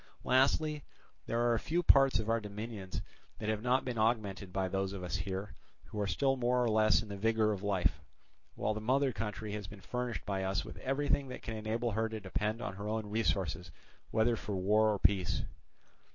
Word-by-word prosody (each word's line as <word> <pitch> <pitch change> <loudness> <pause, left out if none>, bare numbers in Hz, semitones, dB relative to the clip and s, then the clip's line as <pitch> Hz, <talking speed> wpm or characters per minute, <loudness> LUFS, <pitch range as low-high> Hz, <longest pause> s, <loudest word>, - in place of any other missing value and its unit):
Lastly, 145 +3 +3 0.4
there 120 +1 +2
are 115 - +1
few 175 +8 0
parts 135 -6 +6
of 110 0 -2
our 115 0 +2
dominions 105 -2 -5 0.3
that 110 - -3
have 110 -1 0
not 125 +2 +2
been 125 -3 -2
augmented 105 -4 0
by 95 0 0
those 95 +1 -1
of 95 -2 -6
us 90 - -3
here, 95 0 -3 0.3
who 105 - -5
are 100 - 0
still 135 +8 +2
more 125 0 +2
or - - +2
less 110 +1 +4
in - - -10
the 100 - -5
vigour 110 +1 +2
of 100 -3 -3
life; 100 -3 +1 0.5
while 110 - 0
the 110 - -4
mother 130 +3 +2
country 105 -1 -4
has 105 -2 -4
been 100 +1 -11
furnished 125 +3 -3
by 95 -1 -1
us 95 0 -1
with - - -9
everything 140 +1 0
that 125 - -8
can 115 - -4
enable 110 +2 -1
her 110 +2 0
to 110 0 -4
depend 105 +4 -2
on 95 -2 -4
her 100 +1 -5
own 110 -1 -2
resources 95 -5 0 0.4
whether 115 +1 +3
for 105 -2 -4
war 105 +4 +3
or 105 - +2
for - - -22
peace. 95 -2 +3
110 Hz, 210 wpm, -33 LUFS, 100-120 Hz, 0.5 s, parts